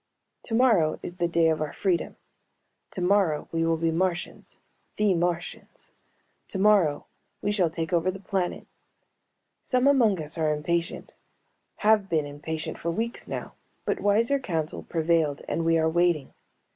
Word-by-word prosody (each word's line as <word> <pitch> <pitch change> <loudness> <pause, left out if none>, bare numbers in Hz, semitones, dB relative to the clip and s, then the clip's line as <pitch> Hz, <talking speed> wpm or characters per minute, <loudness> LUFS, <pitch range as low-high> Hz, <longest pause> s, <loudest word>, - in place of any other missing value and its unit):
Tomorrow 225 -10 +2
is 175 - -7
the 175 - +1
day 170 -1 +3
of 155 -1 0
our 150 -2 -3
freedom. 185 -4 -1 0.7
Tomorrow 180 -4 +1
we 165 0 0
will 165 0 +1
be 165 0 0
Martians, 175 +1 -2 0.4
the 210 -2 +2
Martians. 175 0 -3 0.6
Tomorrow 190 -7 +3 0.4
we 205 - +1
shall 190 -5 +2
take 165 +2 -4
over 170 +1 +2
the 190 +1 -4
planet. 190 -2 -2 1.0
Some 255 0 +1
among 240 -9 +4
us 155 +1 -5
are 155 -1 +2
impatient, 170 +3 -2 0.7
have 210 -2 +4
been 160 -4 +1
impatient 155 +2 -5
for 170 - -2
weeks 230 +8 -3
now, - - -5 0.3
but - - -1
wiser 230 +7 +2
counsel 165 - -3
prevailed 160 -3 0
and 165 - -1
we 165 0 +3
are 160 0 +2
waiting. 170 -3 +1
170 Hz, 145 wpm, -26 LUFS, 160-200 Hz, 1.0 s, among